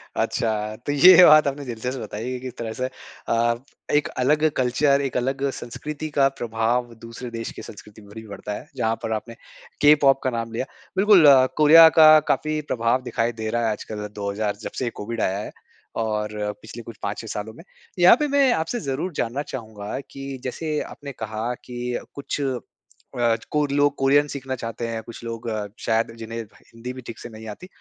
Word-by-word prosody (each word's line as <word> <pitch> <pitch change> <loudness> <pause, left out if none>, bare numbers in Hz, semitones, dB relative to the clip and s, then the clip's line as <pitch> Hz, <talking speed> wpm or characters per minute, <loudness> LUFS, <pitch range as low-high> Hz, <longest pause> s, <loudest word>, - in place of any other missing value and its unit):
अच्छा, 110 -1 -1
तो - - -1
ये 180 +6 +8
बात 155 -2 +7
आपने 140 +1 -3
दिलचस्प 125 +2 -4
बताई 110 +2 -5
है 130 - -4
किस 130 -1 -7
तरह 115 -1 -4
से 125 - -3 0.4
अ, 115 0 +2 0.4
एक 150 0 +2
अलग 150 +5 +3
कल्चर, 140 +3 +2
एक 135 -2 -2
अलग 135 +2 -1
संस्कृति 150 +6 -6
का 135 -1 +6
प्रभाव 120 +1 -1
दूसरे 115 +2 -8
देश 115 0 -5
की - - -6
संस्कृति 105 +1 -12
पर 105 0 -15
भी 110 0 -9
पड़ता 105 0 -6
है, - - -8
जहाँ 110 0 0
पर 110 - -3
आपने 115 +2 -5 0.5
के-पॉप 145 -2 +6
का 130 - +1
नाम 115 -2 -4
लिया। 120 - -2 0.3
बिल्कुल, 195 -4 +6 0.3
कोरिया 160 +2 +9
का 155 -1 +10 0.2
काफ़ी 155 0 -1
प्रभाव 115 +2 +1
दिखाई 120 -1 -1
दे 110 - -2
रहा 120 +1 0
है, 110 - +1
आजकल 105 0 -5
2000 100 +1 -2
जब - - -5
से 130 - -1
ये 120 - -2
कोविड 115 +2 -4
आया 95 - 0
है। 105 - -6 0.5
और 105 -1 -1 0.3
पिछले 115 +2 -10
कुछ 115 - -10
5-6 105 +2 -4
सालों 110 +1 -5
में। 165 - -14 0.4
यहाँ 175 +5 +8
पे 300 - +1
मैं 280 -2 +3
आपसे 165 +8 -2
ज़रूर 140 +6 -3
जानना 120 +3 -2
चाहूँगा 110 -2 -6
कि 135 0 -7
जैसे 150 +4 -3
आपने 140 -1 -8
कहा 110 0 -4
कि 125 0 -4 0.2
कुछ 140 +1 -4
अ, 120 -2 -3 0.2
कोर 150 -2 +1
लोग 145 0 +3
कोरियन 140 +2 +3
सीखना 135 -2 -5
चाहते 115 -1 -5
हैं, 115 -1 -4
कुछ 115 +1 -11
लोग 115 0 -6
अ, 105 -2 -3
शायद 115 0 0
जिन्हें 115 0 -6
भ - - -26 0.2
हिंदी 120 +2 -7
भी 130 - -9
ठीक 115 - -8
से - - -8
नहीं 110 0 -11
आती। 105 - -9
120 Hz, 195 wpm, -23 LUFS, 110-140 Hz, 0.5 s, का